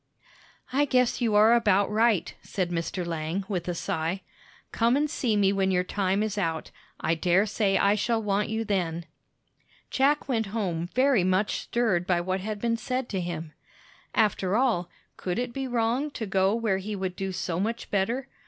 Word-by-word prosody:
"I 285 Hz, +2 st, +3 dB
guess 250 Hz, -2 st, +2 dB
you 225 Hz, -3 st, +2 dB
are 215 Hz, +2 st, +7 dB
about 205 Hz, -4 st, +3 dB
right," 220 Hz, -3 st, +2 dB
said 180 Hz, -3 st, -3 dB
Mr. 170 Hz, +1 st, -2 dB
Lang, 165 Hz, +3 st, -2 dB
with 185 Hz, -4 st, -3 dB
a 175 Hz, -, -1 dB
sigh. 165 Hz, +3 st, -2 dB, 0.5 s
"Come 235 Hz, +3 st, +2 dB
and 300 Hz, +1 st, +2 dB
see 245 Hz, -8 st, 0 dB
me 200 Hz, -1 st, +3 dB
when 195 Hz, -1 st, +1 dB
your 180 Hz, -1 st, +2 dB
time 195 Hz, +2 st, 0 dB
is 210 Hz, -1 st, -2 dB
out; 165 Hz, -4 st, -2 dB, 0.3 s
I 160 Hz, -, +1 dB
dare 175 Hz, +4 st, +3 dB
say 200 Hz, -2 st, +1 dB
I 200 Hz, +1 st, +4 dB
shall 225 Hz, +2 st, +1 dB
want 210 Hz, -1 st, 0 dB
you 220 Hz, +1 st, -2 dB
then." 175 Hz, -5 st, -1 dB, 0.9 s
Jack 280 Hz, +2 st, +2 dB
went 225 Hz, -5 st, 0 dB
home 180 Hz, -5 st, -2 dB
very 255 Hz, -6 st, +4 dB
much 185 Hz, +3 st, +1 dB
stirred 195 Hz, -7 st, 0 dB
by 180 Hz, -2 st, +2 dB
what 185 Hz, +2 st, -1 dB
had 210 Hz, +2 st, -4 dB
been 230 Hz, +1 st, 0 dB
said 255 Hz, +2 st, -3 dB
to 190 Hz, -3 st, -2 dB
him. 165 Hz, -3 st, -5 dB, 0.6 s
After 205 Hz, -3 st, +2 dB
all, 230 Hz, -9 st, +1 dB, 0.3 s
could 180 Hz, -1 st, -3 dB
it 245 Hz, 0 st, -2 dB
be 270 Hz, 0 st, -3 dB
wrong 245 Hz, +4 st, 0 dB
to 225 Hz, -, -3 dB
go 195 Hz, +1 st, +2 dB
where 220 Hz, -5 st, 0 dB
he 205 Hz, +2 st, -4 dB
would 190 Hz, -2 st, -3 dB
do 195 Hz, 0 st, -3 dB
so 180 Hz, -2 st, -3 dB
much 225 Hz, +4 st, -3 dB
better? 230 Hz, +7 st, 0 dB
200 Hz, 185 wpm, -27 LUFS, 185-230 Hz, 0.9 s, are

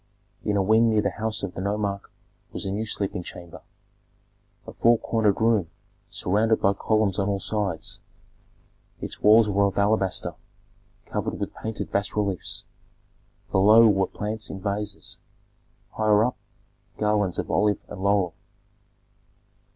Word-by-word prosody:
In 105 Hz, -1 st, 0 dB
a 100 Hz, -, +2 dB
wing 110 Hz, +3 st, +4 dB
near 110 Hz, -1 st, +3 dB
the 100 Hz, -, 0 dB
house 110 Hz, +1 st, -3 dB
of 100 Hz, -, -4 dB
the -, -, -5 dB
nomarch 100 Hz, 0 st, -1 dB, 0.5 s
was -, -, -4 dB
a 95 Hz, -, -2 dB
new 110 Hz, +3 st, -2 dB
sleeping 100 Hz, -3 st, -2 dB
chamber, 85 Hz, -1 st, -11 dB, 1.0 s
a -, -, -9 dB
four 115 Hz, 0 st, +4 dB
cornered 110 Hz, -3 st, +1 dB
room 110 Hz, -7 st, +2 dB, 0.4 s
surrounded 110 Hz, +4 st, +1 dB
by 100 Hz, -, +3 dB
columns 105 Hz, -1 st, +1 dB
on 100 Hz, +1 st, 0 dB
all 100 Hz, -1 st, 0 dB
sides. 100 Hz, -6 st, -3 dB, 1.0 s
Its -, -, -6 dB
walls 110 Hz, +1 st, +6 dB
were 100 Hz, 0 st, +2 dB
of 100 Hz, -, -5 dB
alabaster, 100 Hz, -2 st, +1 dB, 0.7 s
covered -, -, -3 dB
with -, -, -4 dB
painted 110 Hz, -1 st, -5 dB
bas 100 Hz, 0 st, -1 dB
reliefs; 100 Hz, -3 st, -2 dB, 0.9 s
below 105 Hz, +4 st, +6 dB
were 95 Hz, -3 st, +2 dB
plants 105 Hz, +1 st, -5 dB
in 95 Hz, -, -6 dB
vases; 100 Hz, +1 st, -5 dB, 0.7 s
higher 110 Hz, 0 st, +3 dB
up 125 Hz, -, -2 dB, 0.6 s
garlands 105 Hz, -4 st, +1 dB
of -, -, -3 dB
olive 105 Hz, -1 st, +2 dB
and 100 Hz, -, -8 dB
laurel. 100 Hz, -3 st, +2 dB
105 Hz, 140 wpm, -25 LUFS, 100-110 Hz, 1.0 s, walls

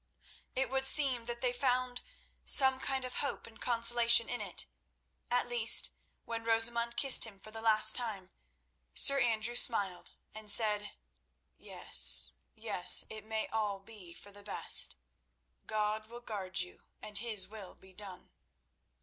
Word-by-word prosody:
It 265 Hz, 0 st, -3 dB
would 265 Hz, 0 st, +2 dB
seem 265 Hz, -6 st, +3 dB
that 240 Hz, 0 st, -8 dB
they 250 Hz, -1 st, -3 dB
found 250 Hz, -1 st, -4 dB, 0.4 s
some 265 Hz, -1 st, +7 dB
kind 265 Hz, -1 st, -4 dB
of 250 Hz, -, -6 dB
hope 280 Hz, -, -5 dB
and 225 Hz, -, -18 dB
consolation 235 Hz, -1 st, +2 dB
in 245 Hz, -, -6 dB
it—at 245 Hz, 0 st, -7 dB
least 235 Hz, -2 st, +2 dB, 0.3 s
when 230 Hz, -1 st, -8 dB
Rosamund 235 Hz, +1 st, 0 dB
kissed 270 Hz, -2 st, +7 dB
him 220 Hz, -3 st, -4 dB
for 215 Hz, +3 st, -16 dB
the 225 Hz, 0 st, -9 dB
last 215 Hz, -1 st, +3 dB
time, 205 Hz, -6 st, -5 dB, 0.6 s
Sir 275 Hz, 0 st, +7 dB
Andrew 235 Hz, -1 st, -3 dB
smiled 200 Hz, -7 st, -2 dB, 0.2 s
and 215 Hz, -1 st, -8 dB
said: 210 Hz, -1 st, +2 dB, 0.6 s
"Yes, -, -, -2 dB, 0.2 s
yes; 200 Hz, -5 st, +3 dB
it 215 Hz, -1 st, -9 dB
may 220 Hz, 0 st, -6 dB
all 210 Hz, -3 st, -5 dB
be 195 Hz, -3 st, -16 dB
for 205 Hz, -, -17 dB
the 205 Hz, 0 st, -15 dB
best. 200 Hz, -, 0 dB, 0.7 s
God 215 Hz, 0 st, -5 dB
will 240 Hz, +1 st, -14 dB
guard 195 Hz, -6 st, -5 dB
you, 180 Hz, -, -12 dB, 0.2 s
and 210 Hz, -1 st, -3 dB
His 215 Hz, -5 st, -5 dB
will 205 Hz, -2 st, -13 dB
be 190 Hz, 0 st, -22 dB
done. 195 Hz, -2 st, -12 dB
225 Hz, 145 wpm, -30 LUFS, 210-240 Hz, 0.7 s, some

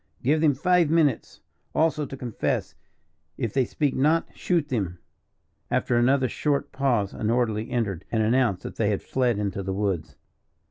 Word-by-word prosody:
"Give 150 Hz, +4 st, +2 dB
them 150 Hz, -4 st, +4 dB
five 180 Hz, +2 st, +3 dB
minutes, 155 Hz, -6 st, +1 dB, 0.3 s
also, 155 Hz, -2 st, +1 dB
to 135 Hz, -, -8 dB
confess; 120 Hz, -4 st, -2 dB, 0.6 s
if 115 Hz, -6 st, -2 dB
they 130 Hz, -2 st, +2 dB
speak 145 Hz, +2 st, -1 dB
not, 155 Hz, +5 st, +2 dB
shoot 165 Hz, -5 st, 0 dB
them." 95 Hz, -8 st, -2 dB, 0.7 s
After 120 Hz, -, +1 dB
another 130 Hz, +2 st, +3 dB
short 145 Hz, +3 st, -1 dB
pause 120 Hz, -8 st, 0 dB
an 110 Hz, -, -2 dB
orderly 115 Hz, -1 st, 0 dB
entered, 100 Hz, -8 st, -2 dB
and 110 Hz, -2 st, +2 dB
announced 115 Hz, -4 st, +2 dB
that -, -, -7 dB
they 105 Hz, -2 st, +1 dB
had 100 Hz, -, -1 dB
fled 125 Hz, -4 st, 0 dB
into 100 Hz, -1 st, -2 dB
the 95 Hz, 0 st, -3 dB
woods. 90 Hz, -7 st, -2 dB
125 Hz, 165 wpm, -25 LUFS, 105-145 Hz, 0.7 s, them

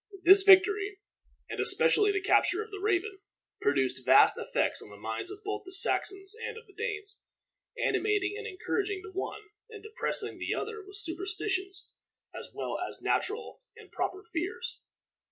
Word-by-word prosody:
This 385 Hz, +3 st, +8 dB
victory, 400 Hz, +1 st, +5 dB, 0.5 s
and -, -, -6 dB
especially 415 Hz, -1 st, +4 dB
the 400 Hz, 0 st, -1 dB
capture 420 Hz, +2 st, +3 dB
of 435 Hz, -, -16 dB
the 400 Hz, -, -7 dB
Raven, 395 Hz, 0 st, -1 dB, 0.4 s
produced 130 Hz, -2 st, 0 dB
vast -, -, +6 dB
effects -, -, -1 dB
on -, -, -12 dB
the 105 Hz, -, -13 dB
minds 110 Hz, -, -4 dB, 0.2 s
both 410 Hz, 0 st, -3 dB
of -, -, -27 dB
the 375 Hz, -, -10 dB
Saxons 390 Hz, +1 st, +2 dB
and 455 Hz, -, -5 dB
of 455 Hz, -, -12 dB
the 395 Hz, -, -21 dB
Danes, 425 Hz, -2 st, -4 dB, 0.6 s
animating 410 Hz, -3 st, 0 dB
and 445 Hz, +1 st, -6 dB
encouraging 395 Hz, 0 st, -3 dB
the 405 Hz, -, -10 dB
one, 395 Hz, +3 st, -5 dB, 0.3 s
and 430 Hz, -3 st, -11 dB
depressing 435 Hz, +3 st, 0 dB
the -, -, -2 dB
other 440 Hz, -1 st, -5 dB
with 395 Hz, +1 st, -8 dB
superstitious 385 Hz, +1 st, -3 dB, 0.4 s
as -, -, -8 dB
well -, -, -4 dB
as -, -, -5 dB
natural 435 Hz, +3 st, -2 dB, 0.2 s
and -, -, -15 dB
proper 380 Hz, +2 st, -3 dB
fears. 440 Hz, +3 st, -4 dB
400 Hz, 160 wpm, -29 LUFS, 380-425 Hz, 0.6 s, This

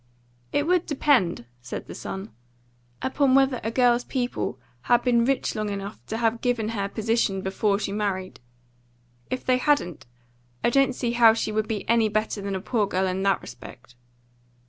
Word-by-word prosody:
"It 290 Hz, -, +1 dB
would 360 Hz, +1 st, +2 dB
depend," 260 Hz, -, +2 dB, 0.2 s
said 120 Hz, -, -6 dB
the -, -, -9 dB
son, 100 Hz, +2 st, -6 dB, 0.7 s
"upon 260 Hz, 0 st, +2 dB
whether 270 Hz, -2 st, +3 dB
a 225 Hz, -, -1 dB
girl's 245 Hz, 0 st, +3 dB
people 245 Hz, -, -3 dB, 0.3 s
had 240 Hz, 0 st, +5 dB
been 235 Hz, -2 st, +3 dB
rich 270 Hz, +1 st, 0 dB
long 215 Hz, -1 st, -2 dB
enough 200 Hz, +1 st, -6 dB
to 220 Hz, -, -3 dB
have 230 Hz, 0 st, 0 dB
given 240 Hz, -4 st, 0 dB
her 200 Hz, -3 st, -2 dB
position 220 Hz, -3 st, 0 dB
before 200 Hz, +1 st, +1 dB
she 200 Hz, -, -3 dB
married. 200 Hz, -3 st, -3 dB, 0.9 s
If 255 Hz, -, -4 dB
they 255 Hz, 0 st, +3 dB
hadn't, 255 Hz, -, 0 dB, 0.6 s
I -, -, +3 dB
don't 270 Hz, -1 st, +3 dB
see 240 Hz, -2 st, -1 dB
how 230 Hz, -2 st, +6 dB
she 220 Hz, -, -2 dB
would 215 Hz, 0 st, -1 dB
be 210 Hz, -2 st, -4 dB
any 225 Hz, -1 st, +3 dB
better 215 Hz, 0 st, -1 dB
than 195 Hz, 0 st, -3 dB
a 190 Hz, -, -3 dB
poor 215 Hz, 0 st, 0 dB
girl 190 Hz, -1 st, 0 dB
in 185 Hz, 0 st, -1 dB
that 195 Hz, 0 st, +1 dB
respect." 120 Hz, -1 st, -12 dB
220 Hz, 175 wpm, -25 LUFS, 195-245 Hz, 0.9 s, how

